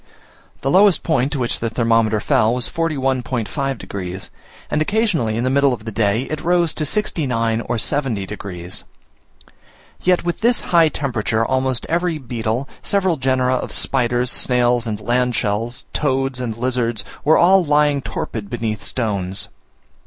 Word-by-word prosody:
The 135 - 0
lowest 195 0 +5
point 140 -4 +1
to - - -1
which 120 -3 -1
the 115 - -1
thermometer 115 -2 +2
fell 110 +3 +2
was 125 - 0
41.5 135 - -1
degs., 95 -2 -6 0.4
and 150 - +1
occasionally 165 - +1
in 115 - -1
the 130 - +1
middle 140 -1 +3
of 110 -3 -7
the 115 - -4
day 105 +2 +1
it 155 +3 -5
rose 175 -1 +2
to 155 - -2
69 125 - 0
or - - 0
70 125 -5 -1
degs. 95 -3 -6 1.2
Yet 180 -1 +2
with 175 +3 -2
this 240 +2 +3
high 165 -2 +4
temperature, 115 -6 -1
almost 130 -1 0
every 170 0 0
beetle, 120 -1 -3
several 190 -4 +1
genera 130 -1 +1
of - - -5
spiders, 125 -1 +1
snails, 120 -1 +2
and 105 -2 -3
land 125 +3 0
shells, 115 +4 -2
toads 135 -2 0
and 115 -3 -4
lizards 120 -3 -1 0.2
were 155 +2 +5
all 185 +2 +5
lying 145 -2 +2
torpid 110 -5 -5
beneath 110 -3 -3
stones. 100 -5 -2
125 Hz, 155 wpm, -20 LUFS, 115-150 Hz, 1.2 s, lowest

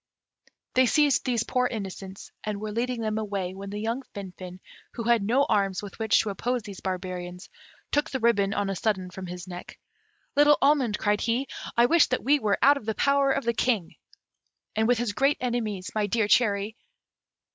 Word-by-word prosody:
They 255 0 +4
seized 295 +1 +3
these 240 -3 +1
poor 250 0 +1
innocents, 195 -3 -7
and 210 -1 -3
were 215 0 -4
leading 240 +2 -2
them 215 -1 -1
away, 200 -4 -3
when 195 +1 -8
the 205 - -5
young 230 +4 -2
Finfin, 185 -2 -8 0.3
who 230 - -5
had 235 -1 +3
no 240 +7 +2
arms 195 -2 +1
with 205 - -9
which 220 -1 +3
to 210 - -3
oppose 245 +4 -2
these 200 -4 -9
barbarians, 180 -1 -5 0.4
took 295 +2 +1
the 265 - -3
ribbon 210 -4 +2
on 200 -1 0
a - - -3
sudden 190 -2 -1
from 185 0 -7
his 180 +1 -7
neck. 180 -1 -9 0.6
"Little 295 +1 +6
almond," 275 -7 +3
cried 205 0 +1
he, 240 +4 0 0.3
"I 235 - +6
wish 330 +5 +5
that 255 - -1
we 285 +3 +4
were 210 -5 +1
out 285 +2 +6
of 235 - -9
the 220 - -1
power 280 0 +3
of 275 0 0
the 235 - +1
King!" 225 -7 0 0.8
"And 220 +1 +2
with 245 0 +3
his 230 -3 -1
greatest 275 +3 +1
enemies, 220 -6 -2
my 210 -1 0
dear 220 +1 +1
cherry!" 210 -1 +2
220 Hz, 195 wpm, -26 LUFS, 195-250 Hz, 0.8 s, Little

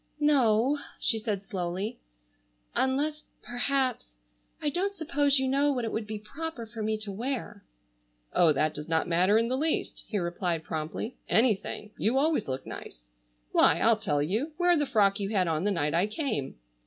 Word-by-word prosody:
"No," 270 -2 +3 0.2
she 225 - +1
said 210 -3 -3
slowly, 190 0 -3 0.7
"unless, 295 +4 +1 0.2
perhaps—I 240 - -3
don't 390 +6 -1
suppose 290 -4 +2
you 265 0 +1
know 280 +2 +2
what 250 -4 -1
it 225 - -3
would 220 -1 -3
be 215 0 -4
proper 265 +4 -6
for 225 0 -8
me 215 0 0
to 215 -1 -4
wear." 225 -1 -4 0.7
"Oh, 170 -3 +5
that 155 +1 +1
does 150 +2 -7
not 160 -1 +1
matter 180 +5 +4
in 230 +1 +2
the 255 - 0
least," 305 +4 -1
he 215 - -2
replied 175 -2 -1
promptly. 160 +11 -4
"Anything. 215 -2 +1
You 230 +5 +2
always 295 -4 +2
look 130 0 -4
nice. - - -10 0.4
Why, - - +5
I'll - - +5
tell 145 -1 0
you, 225 - -1
wear 350 0 +4
the 295 -3 +1
frock 200 -4 +3
you 200 -1 -2
had 190 -4 +1
on 160 +2 0
the - - +3
night 150 -5 0
I 175 +4 +2
came." 215 - -3
215 Hz, 175 wpm, -28 LUFS, 175-270 Hz, 0.7 s, Oh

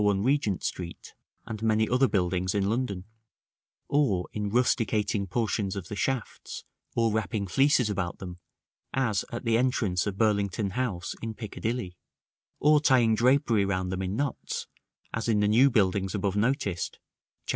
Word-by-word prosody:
1, 100 -1 +2
Regent 125 -7 +1
Street, 85 -2 -5 0.3
and 110 -1 -6
many 110 0 +2
other 130 +2 +3
buildings 90 -2 0
in 100 -1 +1
London; 105 -5 -1 0.8
or 110 -12 +1
in 105 -1 -2
rusticating 105 -3 +1
portions 105 -1 -1
of 95 -3 -6
the 105 - -4
shafts, 130 +3 -3 0.3
or 115 -1 +2
wrapping 110 -1 -1
fleeces 135 +4 +3
about 95 -4 -2
them, 90 -2 -8 0.6
as 110 -7 +1
at 120 +1 -5
the 115 0 +3
entrance 110 -8 +1
of 100 -1 -3
Burlington 100 -2 +1
House, 110 -7 -2
in 115 -1 -4
Piccadilly; 110 -3 -4 0.6
or 150 0 +5
tying 125 -6 +4
drapery 120 -2 +3
round 95 -2 -1
them 95 0 -2
in 95 +1 -2
knots, 140 +1 -3 0.5
as 115 0 -2
in 105 -2 +3
the 105 - +3
new 120 +6 +5
buildings 100 -4 +1
above 100 -1 -1
noticed 105 - 0 0.5
(Chap. - - -15
105 Hz, 155 wpm, -28 LUFS, 95-120 Hz, 0.8 s, or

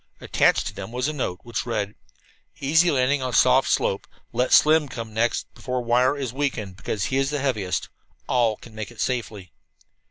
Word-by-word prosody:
Attached - - +2
to - - -4
them - - -7
was 125 +2 -1
a 155 - -2
note, 95 -11 -3
which 120 -2 -3
read: 105 -3 -2 0.7
"Easy 160 +5 +4
landing 135 -1 +2
on 130 -1 -3
soft 130 +2 +4
slope. 95 - 0 0.3
Let 125 +2 0
Slim 155 -1 +5
come 115 -3 -7
next 115 +2 -1
before 125 -1 -3
wire 125 +4 +3
is 130 -4 -4
weakened, 125 -9 -2
because 100 0 -3
he 130 - -1
is 135 0 +1
the 150 - -1
heaviest. 115 -10 -1 0.4
All 115 -4 +2
can 115 - -14
make 110 -1 -6
it 120 - -15
safely." 110 -7 -3
125 Hz, 185 wpm, -24 LUFS, 110-135 Hz, 0.7 s, Slim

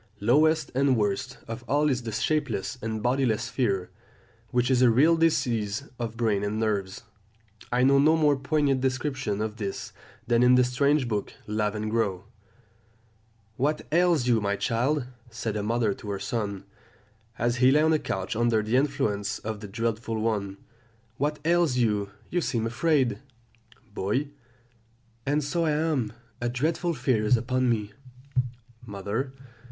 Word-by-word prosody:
Lowest 150 +9 +3
and 135 -1 +3
worst 110 +5 -1
of 115 +2 -6
all 145 +2 +2
is 130 -4 +1
the 115 -2 -5
shapeless 125 -2 -1
and 110 -1 -3
bodiless 120 -3 +1
fear, 100 -9 -1 0.6
which 125 +1 +1
is 125 -1 +3
a 125 - +6
real 145 +9 +5
disease 120 -9 +1 0.2
of 115 -1 -4
brain 110 -4 +1
and 105 +1 -2
nerves. 100 -2 -2 0.7
I 125 +1 +2
know 140 +1 +5
no 155 +3 +5
more 150 -2 +4
poignant 140 -1 +1
description 130 -5 -1
of 110 0 -4
this 100 -3 -5 0.3
than 120 0 +2
in 125 0 +6
the 125 - +5
strange 140 +2 +2
book 105 -3 -2
Lavengro: 105 -2 -1 1.3
"'What 150 +4 0
ails 170 -5 +3
you, 115 -3 +3
my 100 0 0
child,' 125 +7 0 0.2
said 115 -2 -4
a 105 - -1
mother 110 0 +1
to 105 - -9
her 100 -1 -2
son, 105 -5 -3 0.7
as 120 +1 0
he 125 +1 +5
lay 150 +3 +4
on 160 0 +4
a 155 - +2
couch 95 -3 -3
under 115 -1 +2
the 110 +4 +1
influence 110 -8 0
of 110 -1 -5
the 105 - -8
dreadful 115 +1 -2
one; 105 -3 -1 0.6
'what 150 +2 0
ails 170 -5 +3
you? 105 -4 +1 0.2
you 175 - +1
seem 115 -7 -1
afraid!' 130 +2 +1 0.7
"Boy. 110 +9 -1 1.0
And 145 +2 +1
so 165 +4 0
I 155 - +2
am; 150 -8 0 0.3
a 120 - 0
dreadful 160 +7 -1
fear 120 -7 +1
is 115 +3 +4
upon 130 +2 0
me. 105 -3 -1 0.9
"Mother. 110 +5 -4
120 Hz, 155 wpm, -27 LUFS, 110-140 Hz, 1.3 s, a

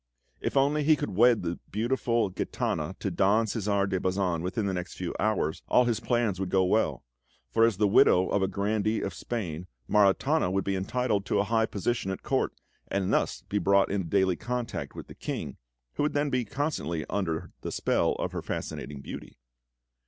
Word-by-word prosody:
If - - -2
only 145 +2 +3
he 155 +2 +5
could 145 0 -4
wed 115 +3 +4
the 85 0 -3
beautiful 115 -1 0
Gitana 90 - -2
to - - -3
Don 105 +4 +3
Cæsar 100 -2 0
de 95 -1 0
Bazan 90 -3 0
within 95 +5 -2
the 95 - 0
next 90 -1 -4
few 90 -2 -4
hours, 100 -7 0
all 125 - +4
his 120 -2 0
plans 120 -6 0
would 95 -1 -2
go 95 0 +3
well; 110 +5 +1 0.5
for 115 0 +5
as 115 -5 +1
the 105 0 +3
widow 95 -2 +5
of 100 - +1
a 95 - +2
Grandee 105 +2 0
of - - -3
Spain, 90 -8 -4 0.2
Maritana 105 - +3
would 95 +1 0
be 100 - -1
entitled 100 +2 0
to - - +1
a 100 - +3
high 110 +1 +1
position 100 +1 -2
at 95 - -4
Court, - - 0 0.4
and 95 -1 -1
thus - - 0
be 105 - -1
brought 100 -1 +3
into 95 -4 -1
daily 95 -1 +3
contact 120 +4 -4
with - - -7
the - - -12
King, - - -5 0.4
who - - -3
would 150 - +1
then 145 0 0
be 125 -2 +1
constantly 135 - -2
under 85 -6 -2
the - - -4
spell - - +1
of - - -3
her - - -4
fascinating 70 -1 -5
beauty. - - -9
100 Hz, 195 wpm, -28 LUFS, 95-115 Hz, 0.5 s, he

